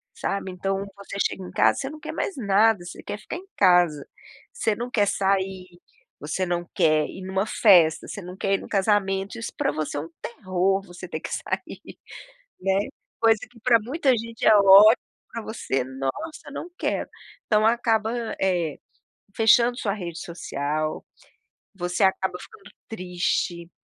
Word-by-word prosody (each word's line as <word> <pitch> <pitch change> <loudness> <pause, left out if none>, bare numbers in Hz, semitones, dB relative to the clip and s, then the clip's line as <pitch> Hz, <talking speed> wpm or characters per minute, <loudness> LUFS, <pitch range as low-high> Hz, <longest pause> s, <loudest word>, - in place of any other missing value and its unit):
sabe. 195 -1 -3
Então, 195 +2 -2 0.2
você 200 0 -8
chega 190 - -3
em 180 - -9
casa, - - +3
você 270 - -3
não 310 +1 -10
quer - - -6
mais 390 - -3
nada, 210 -3 +3
você 180 - -9
quer 205 - -5
ficar 325 - -6
em 370 - -11
casa, 175 -6 +4 0.5
você 225 - 0
não 240 +3 -5
quer 205 -3 +2
sair, 190 -1 0 0.5
você 155 +5 -2
não 175 0 -2
quer 155 -3 +3
ir - - -9
em 185 - -7
uma 190 +2 0
festa, 175 -9 +5
você 200 - -7
não 180 +1 -9
quer 195 0 0
ir - - -3
em - - -9
um - - -11
casamento, 195 0 0
isso 230 - -5
para 280 -1 +1
você 155 -1 -3
é - - -1
um 165 - -9
terror, 190 -3 -1
você 175 +1 -10
ter 160 - -5
que - - -6
sair, - - -5 0.6
né. 190 0 +2 0.4
Coisa 225 -2 +4
que 240 - -19
para 235 -1 +5
muita 270 +6 -1
gente 230 +1 -5
é 215 - +7
ótimo, 200 +3 +8 0.4
para 230 - -5
você: 135 - -2
"Nossa, 135 - -5
não 340 +5 -6
quero!", - - -2 0.4
então 215 -1 +3
acaba, 225 -1 +2 0.3
eh, 175 -5 0 0.6
fechando 235 +2 +5
sua 200 - -1
rede 170 -5 -6
social, 155 -2 -3 0.7
você 180 +1 -2
acaba 190 -1 +1
ficando 440 -2 -14 0.2
triste, 180 -3 -2
195 Hz, 170 wpm, -24 LUFS, 175-225 Hz, 0.7 s, ótimo